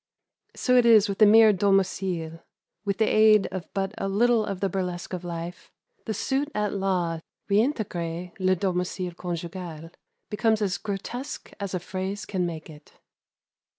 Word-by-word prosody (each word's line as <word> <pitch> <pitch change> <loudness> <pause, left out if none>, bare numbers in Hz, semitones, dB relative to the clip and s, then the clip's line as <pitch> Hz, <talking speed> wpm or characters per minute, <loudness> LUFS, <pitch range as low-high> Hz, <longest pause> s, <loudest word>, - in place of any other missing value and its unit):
So 250 -1 +3
is 230 -4 +6
it - - -4
with 195 - -3
the 215 - +8
mere 220 0 +7
"domicile;" 185 -4 0 0.4
with 200 -2 -1
the 220 - +3
aid 215 -1 +5
of 185 -1 -6
but 195 -1 -1
a 195 - -1
little 230 +3 +3
of 195 -3 -4
the 195 - +1
burlesque 180 -1 -4
of 180 -1 -4
life, 170 0 -6 0.3
the 220 - -2
suit 275 +7 -1
at 210 -1 0
law 185 -4 0
to - - -23 0.3
"reintegrer 180 - -1
le 185 0 +3
domicile 180 0 -2
conjugal" 170 -2 -6 0.4
becomes 220 +1 +2
as 200 -2 -1
grotesque 220 +6 -6
as 200 -2 -3
a - - -1
phrase 190 +3 -4
can 180 -3 -1
make 160 -2 -6
it. 150 -1 -15
190 Hz, 160 wpm, -26 LUFS, 175-210 Hz, 0.4 s, the